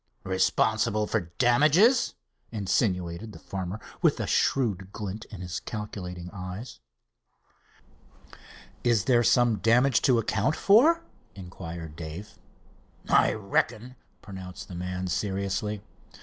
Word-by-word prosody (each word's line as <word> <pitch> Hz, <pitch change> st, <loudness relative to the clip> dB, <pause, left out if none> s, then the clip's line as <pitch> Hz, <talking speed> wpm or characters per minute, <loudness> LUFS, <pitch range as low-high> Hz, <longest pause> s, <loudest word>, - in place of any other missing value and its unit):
"Responsible 110 Hz, +3 st, +1 dB
for 85 Hz, -4 st, -2 dB
damages?" 155 Hz, -, +4 dB, 0.4 s
insinuated 95 Hz, -2 st, -1 dB
the -, -, -10 dB
farmer, 95 Hz, +1 st, -5 dB, 0.2 s
with -, -, +3 dB
a -, -, -1 dB
shrewd 100 Hz, -8 st, 0 dB
glint 105 Hz, +1 st, -6 dB
in 100 Hz, -5 st, -10 dB
his 90 Hz, 0 st, -4 dB
calculating 90 Hz, -5 st, -6 dB
eyes. 95 Hz, +5 st, -7 dB, 2.0 s
"Is 115 Hz, -5 st, +2 dB
there 120 Hz, -2 st, +4 dB
some 120 Hz, -1 st, +3 dB
damage 120 Hz, +3 st, +4 dB
to 125 Hz, -3 st, +4 dB
account 115 Hz, +6 st, +1 dB
for?" 305 Hz, +12 st, +5 dB, 0.3 s
inquired 85 Hz, -4 st, -8 dB
Dave. 85 Hz, +6 st, -8 dB, 0.7 s
"I -, -, +4 dB
reckon," 110 Hz, +4 st, -1 dB, 0.3 s
pronounced 95 Hz, -2 st, -9 dB
the -, -, -8 dB
man 90 Hz, +1 st, -4 dB
seriously. 100 Hz, +2 st, -2 dB
105 Hz, 105 wpm, -27 LUFS, 90-120 Hz, 2.0 s, for